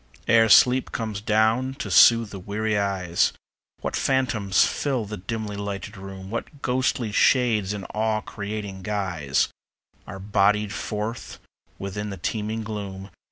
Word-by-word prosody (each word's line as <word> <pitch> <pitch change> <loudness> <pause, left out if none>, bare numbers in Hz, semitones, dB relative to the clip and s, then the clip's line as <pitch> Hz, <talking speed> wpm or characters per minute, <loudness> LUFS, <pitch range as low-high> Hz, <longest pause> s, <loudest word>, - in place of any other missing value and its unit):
Ere 115 -1 +5
sleep 125 +4 +5
comes 110 -3 -4
down 110 +4 +2
to 145 - -5
soothe 115 -2 +6
the 100 - -7
weary 105 +3 -2
eyes, 95 -4 +1 0.5
What - - -3
phantoms 115 -8 +2
fill 130 -6 -1
the 105 +1 -6
dimly 105 +2 -4
lighted 100 0 -5
room; 95 0 -9
What 140 +5 -6
ghostly 125 -3 0
shades 110 -3 +3
in 100 -2 -5
awe 110 0 0
creating 100 -2 -6
guise 95 -8 -1 0.6
Are 95 - -7
bodied 100 +1 +1
forth 105 +4 -5 0.4
within 105 +2 -5
the 100 - -6
teeming 110 +4 -3
gloom. 100 -2 -6
105 Hz, 135 wpm, -24 LUFS, 100-115 Hz, 0.6 s, soothe